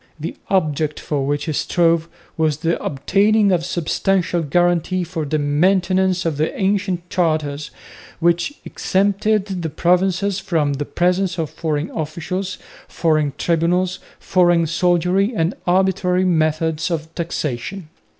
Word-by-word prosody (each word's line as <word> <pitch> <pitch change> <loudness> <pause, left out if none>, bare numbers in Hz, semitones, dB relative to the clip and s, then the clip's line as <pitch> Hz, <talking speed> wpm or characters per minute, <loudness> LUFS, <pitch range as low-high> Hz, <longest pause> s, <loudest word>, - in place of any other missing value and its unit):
The 160 - -5
object 155 -5 0
for 140 -3 -2
which 145 0 -1
he 155 - -2
strove 165 +1 +1 0.3
was 155 -3 +1
the 165 +2 -1
obtaining 200 +8 +2
of 175 -2 +1
substantial 175 +1 0
guarantees 175 +3 +1
for 165 -4 -3
the 155 +2 0
maintenance 185 +5 +2
of 160 -4 -1
the 155 +1 -1
ancient 190 -3 0
charters, 155 -4 0 0.5
which 170 - +1
exempted 200 0 0
the 165 - -2
provinces 185 +4 +1
from 155 -6 0
the 145 +1 -3
presence 180 +2 0
of 160 -3 -2
foreign 155 -1 -2
officials, 175 +5 -4 0.3
foreign 155 -4 +1
tribunals, 175 +2 +1 0.2
foreign 175 -2 +3
soldiery 180 +6 +1
and 165 +2 +1
arbitrary 185 0 +2
methods 160 -2 +1
of 160 -1 -4
taxation. 165 +1 -4
170 Hz, 125 wpm, -20 LUFS, 155-185 Hz, 0.5 s, foreign